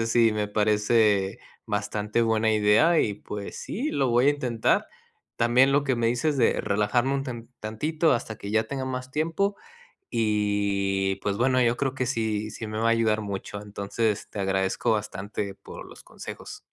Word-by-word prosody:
Entonces 115 0 -1
sí, 115 -2 +5
me 105 -1 -1
parece 105 -1 +2 0.3
bastante 105 +2 -1
buena 110 -1 +2
idea 110 +11 +4
y 105 - 0
pues 105 0 -7
sí, 275 +9 -3
lo 135 -2 +1
voy 120 +3 +4
a 145 - +7
intentar. 125 -6 0 0.5
También 125 +4 +4
lo 145 0 +3
que 130 -3 +1
me 115 -1 +1
dices 145 +5 0
de 120 - +2
relajarme 105 +6 +1
un 135 - -1
tan 120 -3 -7
tantito 155 +10 0
hasta 110 -3 -2
que 100 - -7
ya 110 +1 +2
tenga 130 +3 -4
más 130 0 -4
tiempo 165 +7 0 0.6
y, 100 -3 0
pues 100 -1 -1
bueno, 130 +1 +3
yo 120 0 +3
creo 135 0 -1
que 130 -1 -2
sí, 110 -3 -1
sí 110 0 -6
me 110 - -5
va 115 - +1
a - - +4
ayudar 110 -2 +2
mucho. 100 0 -5
Entonces, 105 +1 -2
te 105 - -7
agradezco 95 +1 0
bastante 100 -1 -3
por - - -11
los - - -14
consejos. - - -9
110 Hz, 180 wpm, -26 LUFS, 105-130 Hz, 0.6 s, a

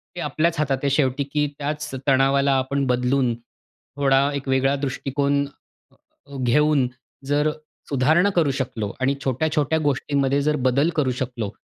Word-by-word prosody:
ते - - -6
आपल्याच 160 +3 0
हातात 140 -3 +1
आहे 140 - +2
शेवटी, 135 -1 +1
की 145 +1 -1
त्याच 150 +1 -3 0.2
तणावाला 135 +1 +3
आपण 140 +1 -1
बदलून, 125 0 +1 0.6
थोडा 140 0 +3
एक 140 -1 -5
वेगळा 135 +1 +2
दृष्टिकोन 140 +1 -1 0.9
अ, - - -8
घेऊन, 145 +1 +3 0.4
जर 145 +2 +1 0.4
सुधारणा 155 +8 +3
करू 160 -5 +3
शकलो 120 -6 -3
आणि 135 +2 +2
छोट्या-छोट्या 150 +3 0
गोष्टींमध्ये 140 0 +1
जर 150 +1 +1
बदल 140 +6 +2
करू 140 -5 +1
शकलो, 120 -5 -3
140 Hz, 140 wpm, -22 LUFS, 130-150 Hz, 0.9 s, तणावाला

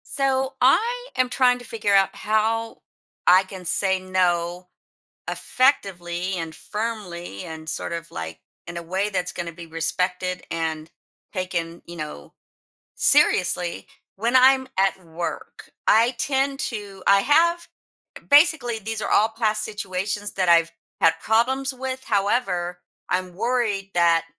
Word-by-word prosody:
So, 270 -1 0
I 475 - +3
am 255 -1 +2
trying 250 -1 +3
to 245 - -11
figure 210 -3 0
out 195 -1 +5
how 225 +1 -1 0.4
I 185 +2 +7
can 185 -1 -10
say, 190 +2 +1
"No." 180 -1 0 0.6
effectively 185 -8 0
and 165 -2 -5
firmly, 200 - -5
and 160 0 -8
sort - - -3
of, 170 0 -6
like, 80 0 -6 0.3
in 175 - -7
a - - -4
way 190 +5 -1
that's 180 -3 -2
gonna 170 -1 -5
be 170 0 -11
respected, 180 +3 -2
and 160 -1 -3 0.4
taken, 170 -3 -3
you 170 - -9
know, 150 - -8 0.6
seriously, 175 -1 +2 0.3
when 235 +5 0
I'm 260 +1 +6
at 195 0 +2
work. 170 +1 -6 0.2
I 230 +3 +5
tend 270 +1 0
to 205 -7 -5
I 200 0 +6
have 340 +6 +3 0.6
basically, 285 -6 +4
these 220 +1 -4
are - - -2
all 215 - +5
past 220 -1 -1
situations 205 0 -3
that 185 -2 0
I've 170 -1 +5 0.3
had 165 - +6
problems 265 +5 +1
with, 260 0 -5
however, 195 -5 0 0.3
I'm 180 0 -1
worried 215 -3 -1
that, 170 -1 +4
195 Hz, 135 wpm, -23 LUFS, 175-240 Hz, 0.6 s, I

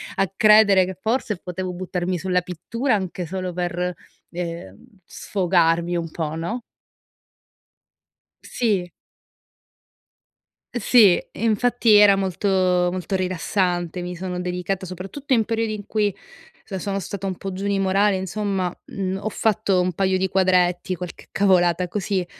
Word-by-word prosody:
a 195 -1 0
credere 210 -3 +6
che 185 0 -7
forse 225 -2 -1
potevo 180 0 -5
buttarmi 180 0 -3
sulla 180 +1 +1
pittura 215 - -2
anche 185 -2 -3
solo 185 +1 -4
per, 180 0 -2 0.4
ehm, 170 - -6 0.3
sfogarmi 175 -2 +1
un 165 -1 -3
po', 155 -1 -4
no? 175 +10 -3 1.8
Sì. 200 -7 -1 1.8
Sì, 225 -5 +5
infatti 230 +1 +2
era 205 -1 +7
molto, 195 0 -2
molto 185 0 +1
rilassante. 180 -1 -1
Mi 180 0 -5
sono 180 0 -4
dedicata 180 +1 -3
soprattutto 195 - -4
in 225 -3 +4
periodi 225 0 -1
in 205 -2 -7
cui, 210 -3 0 0.5
sono 195 0 -4
stata 195 +1 -5
un 190 - -2
po' 195 +2 -6
giù 190 +2 -5
di 200 - +1
morale, 195 +1 +2
insomma, 190 -1 -2
mhmm, 190 -1 -3
ho 215 - -3
fatto 215 -4 +1
un 180 - 0
paio 190 +1 +1
di 190 0 0
quadretti, 185 -1 +2
qualche 180 0 -8
cavolata 180 -2 +2
così, 190 -1 -1
185 Hz, 130 wpm, -22 LUFS, 180-200 Hz, 1.8 s, era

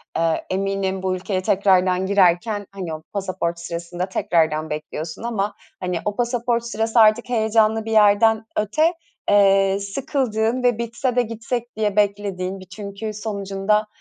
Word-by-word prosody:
aaa, 165 -1 +2
eminim 195 0 -1
bu 185 -1 0
ülkeye 185 0 -2
tekrardan 185 -1 +2
girerken, 200 +2 +2
hani, 185 -5 -5
o 155 - -6
pasaport 185 -3 -2
sırasında 170 +1 -4
tekrardan 160 -3 +1
bekliyorsun 155 +4 -5
ama, 210 -3 -1 0.3
hani, 180 -2 -2
o 205 0 -1
pasaport 240 -1 0
sırası 225 0 0
artık 220 +3 +5
heyecanlı 220 -1 +2
bir 225 - -4
yerden 220 +1 +4
öte, 310 - +2 0.4
eee, 195 -1 +4
sıkıldığın 235 +1 -1
ve 245 -3 +3
bitse 235 +2 -2
de 245 - +4
gitsek 235 +1 -4
diye 210 -2 0
beklediğin 200 -2 0
bir, 185 - -11
çünkü 205 +2 -6
sonucunda, 210 0 -1
205 Hz, 140 wpm, -22 LUFS, 185-225 Hz, 0.4 s, artık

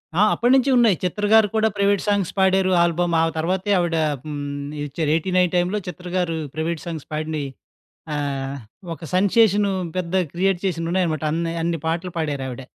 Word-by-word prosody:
ఆ! 185 - +3
అప్పట్నించి 260 +3 +3
ఉన్నాయి. 230 -5 +5
'చిత్ర' 205 +3 -1
గారు 220 -1 +7
కూడా 220 0 +3
ప్రైవేట్ 200 0 +2
సాంగ్స్ 200 -4 +1
పాడారు 190 0 +3
ఆల్బమ్. 170 0 0
ఆ - - +3
తర్వాతే 185 +5 -1
ఆవిడ 170 -2 0 0.3
హ్మ్, 150 -1 -5 0.5
ఇచ్చారు 150 +2 -2
89 180 +1 +1
టైంలో 180 +4 +1
'చిత్ర' 180 +1 -7
గారు 165 -3 0 0.2
ప్రైవేట్ 160 0 -2
సాంగ్స్ 165 -4 -6
పాడినయి 155 -2 -3 0.7
ఆహ్, 140 -1 -3 0.4
ఒక 160 +1 -9
సెన్సేషను 205 +1 +3 0.3
పెద్ద 180 -1 -3 0.2
క్రియేట్ 185 +1 +1
చేసినయి 165 -2 -1
ఉన్నాయన్నమాట. 170 -4 0
అన్నే 165 0 -1
అన్ని 170 -2 -1
పాటలు 170 +3 -2
పాడారావిడ. 135 -5 -3
175 Hz, 155 wpm, -22 LUFS, 160-190 Hz, 0.7 s, గారు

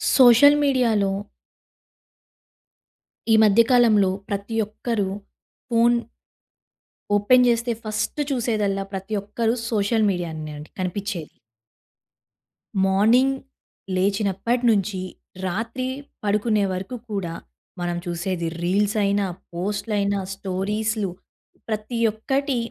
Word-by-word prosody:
Social 260 +3 +8
మీడియాలో... 230 -8 +2 2.2
ఈ - - +6
మధ్య 215 +1 +6
కాలంలో 220 -6 +5 0.2
ప్రతి 200 +3 -3
ఒక్కరూ 215 -1 -2 0.6
ఫోన్... 235 0 +4 1.2
ఓపెన్ 250 +5 +5
చేస్తే 235 0 +1
ఫస్ట్ 215 +6 -3
చూసేదల్లా 215 -6 0
ప్రతి 195 +2 -5
ఒక్కరు 225 +3 -1 0.2
సోషల్ 215 0 +1
మీడియానే 160 -4 -4
అండి 150 +1 -10
కనిపించేది. 185 -2 -3 1.6
మార్నింగ్ 225 +8 +4 0.6
లేచినప్పటి 200 +5 0
నుంచి, 200 -2 +1 0.5
రాత్రి 230 +7 -3 0.4
పడుకునే 210 +1 +1
వరకు 190 +6 -5 0.2
కూడా 190 -5 -3 0.5
మనం 175 0 -2
చూసేది 175 0 -2
రీల్స్ 200 +5 +1
అయినా, 200 0 +1 0.3
పోస్ట్‌లు 205 +5 -3
అయినా, 200 0 0
స్టోరీస్‌లు 205 +2 -2 0.6
ప్రతి 215 +2 -3
ఒక్కటి 270 +5 -1
210 Hz, 90 wpm, -23 LUFS, 195-230 Hz, 2.2 s, సోషల్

